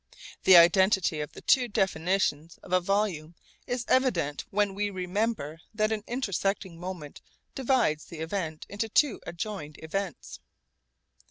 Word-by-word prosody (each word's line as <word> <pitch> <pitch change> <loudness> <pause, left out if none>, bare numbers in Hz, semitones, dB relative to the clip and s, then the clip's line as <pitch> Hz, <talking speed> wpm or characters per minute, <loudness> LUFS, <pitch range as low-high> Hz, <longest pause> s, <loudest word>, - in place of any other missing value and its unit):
The 185 -2 +9
identity 185 -2 +5
of 150 - -6
the - - -11
two 255 -2 +4
definitions 185 -6 0
of 180 - -7
a 185 - +4
volume 175 -4 -1 0.3
is 245 -1 -2
evident 180 - +1
when 205 -2 +1
we 205 +1 -1
remember 185 -4 -2 0.2
that 215 0 +1
an 215 -2 -2
intersecting 195 -7 -2
moment 175 -5 -7 0.3
divides 250 - +1
the 165 - -10
event 160 -1 -4
into 205 +2 -3
two 270 +1 +2
adjoined 170 -5 -5
events. 190 +3 -4
190 Hz, 135 wpm, -28 LUFS, 165-210 Hz, 0.3 s, The